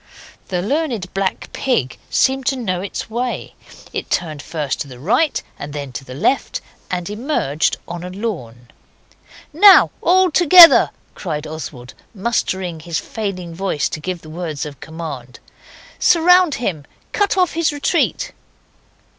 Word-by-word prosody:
The 180 -1 -2
Learned 240 - -2
Black 195 -1 -3
Pig 155 - -1
seemed 265 -1 +1
to 275 - +2
know 185 -8 -2
its 195 - -5
way. 240 +3 -4 0.4
It - - -4
turned 155 -4 -2
first 150 -4 -3
to - - -4
the 130 -2 -11
right 245 - +1 0.2
and 145 0 -7
then 140 -3 -5
to 130 - -7
the 130 -1 -10
left, 260 - 0 0.3
and 180 -1 -3
emerged 210 - -1
on 175 0 -6
a 180 - -6
lawn. 145 - -6 0.8
'Now, 390 +5 +7
all 370 0 +4
together!' 345 +1 +8 0.2
cried 155 -5 -5
Oswald, 150 -5 -8 0.2
mustering 190 -5 -2
his 165 +1 -4
failing 190 -6 -5
voice 175 -4 -1
to - - -5
give 180 +2 -5
the 155 - -11
word 160 -3 -4
of 145 -3 -9
command. 150 -6 -8 0.6
'Surround 355 -1 +5
him! 170 - -3 0.3
cut 405 -1 +1
off 360 -3 +2
his 330 0 +1
retreat! 295 +11 0
185 Hz, 145 wpm, -19 LUFS, -, 0.8 s, together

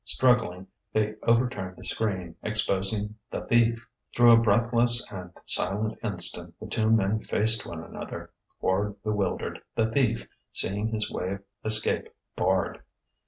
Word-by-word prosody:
Struggling, 115 -7 +1 0.3
they 110 0 +1
overturned 115 -6 0
the - - -11
screen, 95 -6 -2
exposing 105 0 -1
the - - -4
Thief. 115 0 +1 0.3
Through 120 0 +7
a 115 - +7
breathless 120 +2 +5
and 90 -3 -7 0.2
silent 105 +3 +3
instant 90 -5 -2
the - - -8
two 110 -1 -1
men 110 -1 +2
faced 110 0 +2
one 80 -1 -7
another, - - -8 0.3
Quard 100 +2 0
bewildered, 105 -3 -2
the 110 0 +1
Thief 115 -3 0 0.2
seeing 105 +3 -1
his 110 -1 -3
way 90 +2 -3
of 100 - -8 0.2
escape 110 0 0 0.3
barred. 95 +1 0
110 Hz, 135 wpm, -27 LUFS, 95-115 Hz, 0.3 s, Through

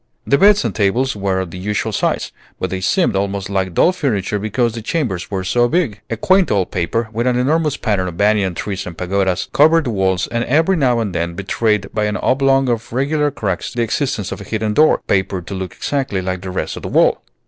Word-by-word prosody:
The 140 - +3
beds 205 +2 +5
and - - -1
tables 115 +6 +1
were 95 -2 -1
of 90 -3 -6
the 90 - -7
usual 105 +2 -2
size, - - -1 0.3
but 95 - -3
they 95 -1 -3
seemed 180 - +1
almost 100 0 -2
like 95 -3 -1
doll - - +5
furniture 105 - -1
because 110 +3 0
the 115 - -5
chambers 110 - -2
were 95 -2 -3
so 120 +6 +2
big. 150 - -1
A - - -2
quaint 190 -2 +3
old 95 -3 0
paper, 100 +6 -1
with 120 +3 -1
an 125 -1 +2
enormous 150 +3 +1
pattern 100 -5 0
of 85 -2 -7
banyan 100 -3 +2
trees 100 0 -4
and 85 -2 -8
pagodas, 95 0 0
covered 160 +3 +5
the 125 - -2
walls, 95 -3 +1
and 115 0 -2
every 160 +8 +2
now 125 -7 +2
and 105 -5 -3
then 85 0 -2
betrayed 100 +1 -1
by 105 -1 0
an 105 0 -1
oblong 135 0 +2
of 115 -2 -2
regular 145 +4 +1
cracks 100 -10 -3
the 120 - -1
existence 115 -3 -2
of - - -6
a - - -6
hidden 110 +1 -2
door, 155 +7 +4
papered 95 -2 0
to 100 - -6
look 95 -1 -5
exactly 135 -9 -2
like 95 0 -3
the 95 - -6
rest 90 - -3
of - - -8
the - - -5
wall. - - +3
105 Hz, 225 wpm, -18 LUFS, 95-135 Hz, 0.3 s, beds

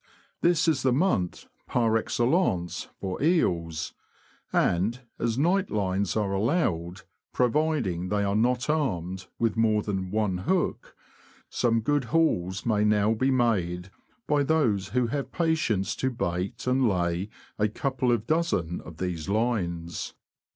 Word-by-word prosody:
This 175 0 +3
is 155 -5 +2
the 130 - +2
month 125 - 0 0.2
par 115 -2 +2
excellence 115 - 0
for 95 +2 -4
eels, 85 - +1 0.6
and, 100 +8 +1 0.2
as 115 0 0
night 185 +7 +2
lines 100 -1 0
are 100 -2 0
allowed, 95 - 0 0.3
providing 125 - +1
they 105 0 +1
are 100 0 0
not 125 +3 +1
armed 95 - -1
with 115 -2 +1
more 110 -2 +2
than 95 -3 -3
one 105 -3 0
hook, 175 - -1 0.5
some 115 -2 +1
good 145 +3 +1
hauls 100 - +1
may 105 -3 +2
now 105 0 +3
be 130 +4 +1
made 100 -8 0 0.3
by 145 -1 +2
those 135 -10 +1
who 125 +5 +1
have 140 +3 -3
patience 155 - 0
to 130 - 0
bait 100 0 -3
and 125 -1 +3
lay 90 +1 -1 0.3
a 105 - +3
couple 130 +3 -1
of 115 -2 0
dozen 135 - 0
of 85 -2 -11
these 90 -2 -3
lines. 90 -7 -1
110 Hz, 135 wpm, -27 LUFS, 95-130 Hz, 0.6 s, This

